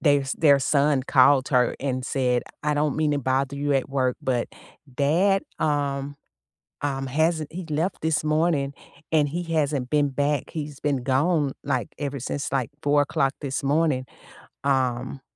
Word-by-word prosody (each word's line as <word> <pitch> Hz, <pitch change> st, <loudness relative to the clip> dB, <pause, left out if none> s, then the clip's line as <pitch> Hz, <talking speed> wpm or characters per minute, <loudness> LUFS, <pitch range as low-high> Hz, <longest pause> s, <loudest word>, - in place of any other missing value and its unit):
their 145 Hz, -2 st, +4 dB
s 135 Hz, -, -3 dB
their 145 Hz, -3 st, +6 dB
son 140 Hz, 0 st, +2 dB
called 135 Hz, 0 st, +4 dB
her 125 Hz, -3 st, +2 dB
and 130 Hz, -2 st, -2 dB
said, 125 Hz, -2 st, +1 dB, 0.2 s
"I 150 Hz, 0 st, +1 dB
don't 150 Hz, -1 st, 0 dB
mean 155 Hz, -1 st, +1 dB
to 145 Hz, -, +1 dB
bother 135 Hz, +1 st, 0 dB
you 145 Hz, 0 st, 0 dB
at 135 Hz, -, 0 dB
work, 130 Hz, -2 st, 0 dB
but 125 Hz, -2 st, 0 dB, 0.5 s
dad, 175 Hz, +8 st, +2 dB, 0.2 s
um 140 Hz, -2 st, -1 dB, 0.7 s
um, 135 Hz, -2 st, -2 dB
hasn't 160 Hz, +2 st, 0 dB
he 180 Hz, +2 st, -5 dB
left 160 Hz, +5 st, -1 dB
this 160 Hz, -1 st, 0 dB
morning, 155 Hz, -2 st, +1 dB, 0.4 s
and 150 Hz, -2 st, +3 dB
he 175 Hz, +4 st, -3 dB
hasn't 145 Hz, -4 st, 0 dB
been 145 Hz, -1 st, +3 dB
back. 145 Hz, 0 st, 0 dB
He's 150 Hz, -3 st, -6 dB
been 140 Hz, -4 st, 0 dB
gone, 145 Hz, +2 st, +2 dB
like, 130 Hz, -6 st, -1 dB
ever 140 Hz, -1 st, -3 dB
since, 140 Hz, +3 st, -3 dB
like, 135 Hz, -1 st, 0 dB
04:00 145 Hz, -2 st, +2 dB
this 140 Hz, 0 st, -3 dB
morning, 145 Hz, -2 st, +1 dB, 0.6 s
um, 130 Hz, -1 st, 0 dB
140 Hz, 160 wpm, -24 LUFS, 135-150 Hz, 0.7 s, their